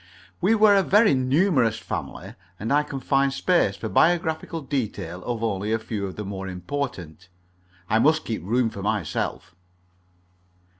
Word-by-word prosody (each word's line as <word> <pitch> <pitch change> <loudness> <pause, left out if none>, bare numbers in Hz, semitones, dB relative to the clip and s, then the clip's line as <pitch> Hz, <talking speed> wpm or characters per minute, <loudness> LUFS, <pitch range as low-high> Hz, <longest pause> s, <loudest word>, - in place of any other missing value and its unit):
We 200 +5 +4
were 215 -1 +6
a 195 - +5
very 205 0 +4
numerous 130 - +2
family, - - -6 0.3
and 115 +6 -1
I 145 - +4
can 140 -2 -6
find 135 +1 +1
space 135 - +1
for 110 - -5
biographical 160 +4 +1
details 105 - -4
of 115 -2 -3
only 105 -1 -1
a 115 - +2
few 110 -3 -4
of 95 - -8
the 105 - -6
more 95 -1 -5
important. 90 - -5 0.6
I 110 - +2
must 155 +5 +3
keep 110 -5 -4
room 115 +4 +1
for 100 - -8
myself. 100 -6 -3
120 Hz, 155 wpm, -24 LUFS, 100-150 Hz, 0.6 s, were